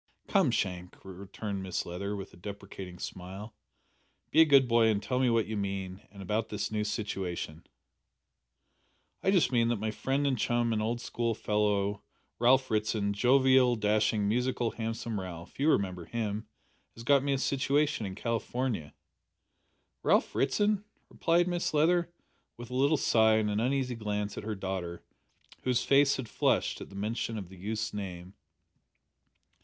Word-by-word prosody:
"Come, - - +3
Shank," 90 -1 -2
returned 100 +1 -6
Mrs 95 -2 -2
Leather, 100 +4 -4
with 95 -1 -7
a - - -13
deprecating 95 -1 -8
smile, 95 +5 -7 0.8
"be 160 - +6
a - - +8
good 140 -4 +6
boy 115 -1 +4
and 110 -2 +2
tell 125 -1 -1
me 130 -1 +3
what 115 -2 +2
you 110 +3 -4
mean 95 -2 -3
and 100 -1 -10
about 105 +4 -1
this 105 0 -3
new 105 -1 0
situation." 95 -6 -4 1.5
"I - - +1
just 185 -9 +3
mean 115 -2 +3
that 120 - +1
my 110 +1 -1
friend 135 +5 -1
and 130 -4 +1
chum 120 0 +1
and 110 - 0
old 115 +2 -1
schoolfellow 105 -4 0 0.4
Ralph 130 +2 +4
Ritson 105 -1 0
jovial, 130 +2 +4
dashing, 105 -1 +1
musical, 125 +1 0
handsome 115 -1 -3
Ralph 90 0 -8
you 145 +3 +3
remember 90 - 0
him 110 0 -3 0.5
has 115 - -10
got 140 +2 +4
me 140 0 0
a - - +1
situation 140 0 +1
in 95 - -6
California." 115 - -2 1.1
"Ralph - - +2
Ritson?" 205 -1 +1 0.3
repeated 170 +1 +2
Mrs 175 -3 -1
Leather, 170 +3 +3 0.5
with 120 0 -9
a - - -4
little 140 +4 +3
sigh 110 -4 +4
and 105 -1 +1
an 105 - 0
uneasy 130 +1 0
glance 105 -2 -3
at - - -6
her 110 -1 -2
daughter, 95 -3 -4 0.6
whose 125 -2 +1
face 140 0 +4
had 130 -3 -5
flushed - - +1
at - - -8
the - - -13
mention 110 +2 -2
of 95 -4 -6
the 95 - -12
youth's 105 +3 -3
name. 95 -2 -6
110 Hz, 160 wpm, -30 LUFS, 100-125 Hz, 1.5 s, a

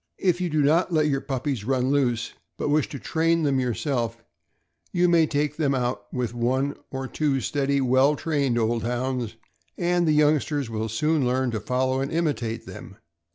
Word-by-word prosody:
If 180 -1 +1
you 180 - 0
do 155 -1 +1
not 160 +6 +3
so 170 - -2
let 155 -1 +3
your 135 -1 0
puppies 130 -3 -3
run 130 +2 0
loose, 120 -5 0 0.2
but - - -2
wish 150 -1 +2
to 140 - -6
train 165 +4 +1
them 140 -3 +2
yourself, 120 -2 -2 0.7
you 180 0 +3
may 170 -2 +4
take 150 0 -1
them 140 -4 +1
out 125 -1 -2
with 125 -3 -2
one 130 +4 0
or 135 0 -4
two 140 -1 0
steady, 140 +4 0
well 130 +3 +4
trained 140 -6 0
old 115 0 +1
Hounds, 125 -1 -2 0.4
and 175 -1 +1
the 155 - +4
youngsters 150 -3 +2
will 110 0 -2
soon 150 +7 +1
learn 130 0 +1
to 110 - -2
follow 130 +4 0
and 135 - -3
imitate 130 -9 -1
them. 95 +1 -10
135 Hz, 185 wpm, -25 LUFS, 120-150 Hz, 0.7 s, may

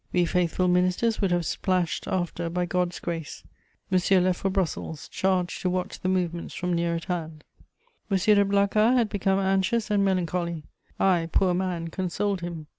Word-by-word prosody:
We 180 -1 +2
faithful 180 +1 +1
ministers 180 +6 +2
would 195 - +2
have 175 -1 +1
splashed 180 -1 -1
after 175 -2 -2
by 180 +1 -1
God's 180 0 -1
grace. 165 -3 -5 0.5
Monsieur 185 +1 +4
left 180 0 +1
for 195 - 0
Brussels, 180 -5 -3
charged 185 -2 -1
to 185 - 0
watch 180 0 -3
the 185 - -1
movements 175 -2 -2
from 180 0 -2
near 170 0 0
at 165 - -5
hand. 160 -3 -4 0.7
M. 195 - +2
de 205 +1 +4
Blacas 200 +4 +3
had 230 -3 +2
become 195 -1 +1
anxious 195 +3 +1
and 205 -1 +3
melancholy; 175 -3 -1 0.4
I, 175 -4 +2
poor 185 -2 +3
man, 175 -2 -2
consoled 190 +2 -2
him. 170 -3 -6
180 Hz, 170 wpm, -26 LUFS, 175-195 Hz, 0.7 s, Monsieur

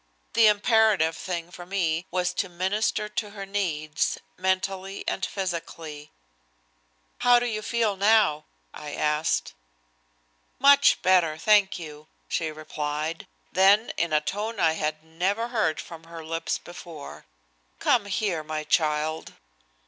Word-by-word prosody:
The 225 -1 +6
imperative 210 -5 +3
thing 170 0 -5
for 175 - -9
me 175 -2 -1
was 180 0 0
to 190 - -2
minister 205 +4 -1
to 210 0 -4
her 200 -1 -7
needs, 160 -6 -1 0.2
mentally 190 +1 -2
and - - -2
physically. 165 -5 -5 1.1
"How 245 0 +6
do 240 - 0
you 215 -3 -2
feel 225 -2 0
now?" 200 -6 +3 0.3
I 150 -1 -7
asked. 150 +1 0 1.0
"Much 280 +1 +6
better, 175 -4 +3
thank 205 +2 +4
you," 155 -3 -10 0.2
she 160 - -1
replied. 155 +1 -4 0.2
Then 200 +4 +4
in 170 -1 -1
a 150 0 +3
tone 210 +7 -3
I 160 - +4
had 155 -1 -3
never 190 +8 -1
heard 215 -10 0
from 165 -1 -9
her 165 -1 -9
lips 165 0 -2
before: 170 - -11 0.5
"Come 230 -5 +2
here, 190 -5 -1
my 155 0 -4
child." 155 0 0
175 Hz, 130 wpm, -26 LUFS, 155-205 Hz, 1.1 s, The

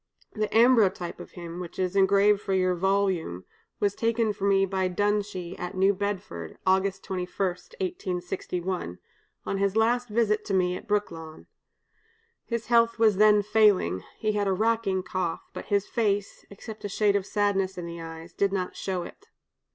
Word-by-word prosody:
The 215 -1 -1
'ambrotype' 220 -7 +3
of - - -11
him, 170 -1 -7
which 175 -2 -8
is 185 0 -1
engraved 200 +1 +4
for 195 - -2
your 185 -1 +2
volume, 185 - 0 0.3
was 200 -1 +1
taken 225 0 0
for 200 - -4
me 195 -1 +4
by 190 -1 -1
Dunshee, 200 -2 -1
at 180 +1 -5
New 190 +2 +4
Bedford, 185 - -4
August 190 +1 +1
21, 180 -2 -3
1861, 180 - -3 0.5
on 195 - -2
his 200 0 +1
last 240 +2 +2
visit 210 -1 +1
to 195 - -1
me 180 -1 +2
at 220 - -9
Brooklawn. 165 -7 -3 1.0
His 235 -1 -3
health 230 -1 +3
was 220 -4 +4
then 210 0 +5
failing, 210 - +3
he 215 - 0
had 205 -1 0
a 195 - +2
racking 215 -2 +1
cough, 185 -2 -3
but - - -7
his 200 -1 +1
face, 205 -3 -1
except 215 +2 -10
a 205 - -3
shade 205 0 +2
of 200 -1 0
sadness 195 -2 0
in 175 - -5
the 170 0 -7
eyes, 165 +1 -9
did 200 -1 +1
not 185 -2 -2
show 185 -2 -3
it. 410 - -12
195 Hz, 165 wpm, -27 LUFS, 180-210 Hz, 1.0 s, then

